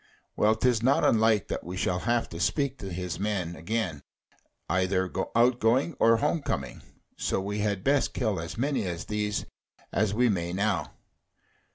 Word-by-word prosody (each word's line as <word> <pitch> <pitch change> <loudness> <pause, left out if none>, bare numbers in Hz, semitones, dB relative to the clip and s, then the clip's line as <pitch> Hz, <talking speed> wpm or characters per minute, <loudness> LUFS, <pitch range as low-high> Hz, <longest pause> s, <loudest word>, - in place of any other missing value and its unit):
Well, 110 +1 +3
'tis 120 0 +2
not 130 +4 +3
unlike 110 -2 +3
that - - -3
we 90 +3 -6
shall 90 -1 0
have 120 +3 0
to 85 - -7
speak 135 - 0
to 95 - -6
his 90 -1 -4
men 95 -4 -2
again, 90 -4 -2 0.7
either 95 0 +1 0.2
out 120 +1 +4
going 125 +9 +2
or 115 0 +5
home 155 +7 0
coming: - - -3 0.4
so - - 0
we 100 +2 -3
had 100 -2 -1
best 140 0 +2
kill 110 -8 0
as 80 +5 -6
many 135 -4 0
of 85 -2 -4
these 105 -1 -2 0.5
as 105 0 +2
we 125 +2 +4
may 85 -5 -1
now. 100 +2 -1
105 Hz, 170 wpm, -28 LUFS, 95-120 Hz, 0.7 s, or